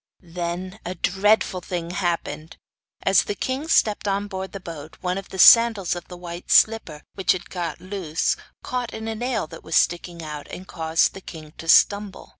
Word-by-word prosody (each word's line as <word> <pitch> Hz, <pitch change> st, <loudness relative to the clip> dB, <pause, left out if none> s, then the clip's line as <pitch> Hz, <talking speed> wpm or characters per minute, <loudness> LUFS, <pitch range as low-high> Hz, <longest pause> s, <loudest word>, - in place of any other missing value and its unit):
Then 180 Hz, +3 st, -4 dB
a 180 Hz, -, -5 dB
dreadful 190 Hz, +1 st, +1 dB
thing 175 Hz, -1 st, -4 dB
happened. 170 Hz, -3 st, -3 dB, 0.5 s
As 195 Hz, -1 st, +4 dB
the 205 Hz, -, -3 dB
king 260 Hz, +8 st, -3 dB
stepped 210 Hz, -9 st, +2 dB
on 200 Hz, +1 st, 0 dB
board 190 Hz, -2 st, -6 dB
the 195 Hz, -, -7 dB
boat 160 Hz, -4 st, -9 dB
one 180 Hz, +1 st, -1 dB
of 195 Hz, -, -12 dB
the 190 Hz, -, -8 dB
sandals 225 Hz, -4 st, +7 dB
of 175 Hz, -, -8 dB
the 180 Hz, -, -10 dB
white 175 Hz, 0 st, -8 dB
slipper, 215 Hz, -9 st, +3 dB
which 190 Hz, -, +2 dB
had 180 Hz, -1 st, -8 dB
got 175 Hz, -3 st, -4 dB
loose, 185 Hz, -5 st, -1 dB, 0.3 s
caught 250 Hz, -2 st, -3 dB
in 220 Hz, 0 st, -6 dB
a 225 Hz, -, -2 dB
nail 240 Hz, -2 st, -2 dB
that -, -, -12 dB
was 160 Hz, -, -3 dB
sticking 170 Hz, -1 st, +1 dB
out, 150 Hz, -2 st, -7 dB
and 185 Hz, +1 st, -9 dB
caused 160 Hz, -1 st, +1 dB
the 195 Hz, -, -10 dB
king 155 Hz, -4 st, -11 dB
to 165 Hz, -, -8 dB
stumble. 200 Hz, +2 st, +3 dB
185 Hz, 190 wpm, -23 LUFS, 170-205 Hz, 0.5 s, sandals